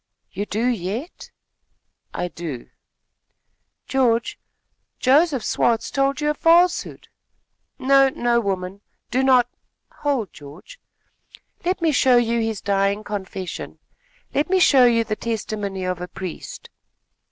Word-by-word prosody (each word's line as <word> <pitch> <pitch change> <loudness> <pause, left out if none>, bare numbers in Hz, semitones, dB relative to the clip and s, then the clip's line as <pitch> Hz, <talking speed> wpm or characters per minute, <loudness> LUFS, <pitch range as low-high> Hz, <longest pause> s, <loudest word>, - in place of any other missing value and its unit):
"You 205 +2 -4
do 220 +3 -1
yet?" 235 - -3 0.8
"I 175 0 -3
do." 160 -8 -7 1.1
"George, 240 -3 +1 0.6
Joseph 275 -1 +3
Swartz 230 -2 +1
told 275 +1 0
you 300 0 +2
a - - -1
falsehood." 345 +3 +2 0.7
"No, 270 0 +4
no, 240 -2 +1
woman, 195 -2 -3 0.3
do 255 - +2
not 260 -2 +4 0.3
" - - -53
"Hold, 260 - -1
George; 150 - -13 0.8
let 365 0 -1
me 325 - +3
show 255 -3 +4
you 235 0 +1
his 225 -3 -2
dying 200 +1 0
confession. 190 -3 -6 0.6
Let 290 - 0
me 380 - +3
show 270 -7 +6
you 230 -1 +3
the 215 -1 -3
testimony 210 -4 -4
of 180 -1 -3
a 180 - -4
priest." 185 -2 -8
230 Hz, 125 wpm, -22 LUFS, 195-270 Hz, 1.1 s, show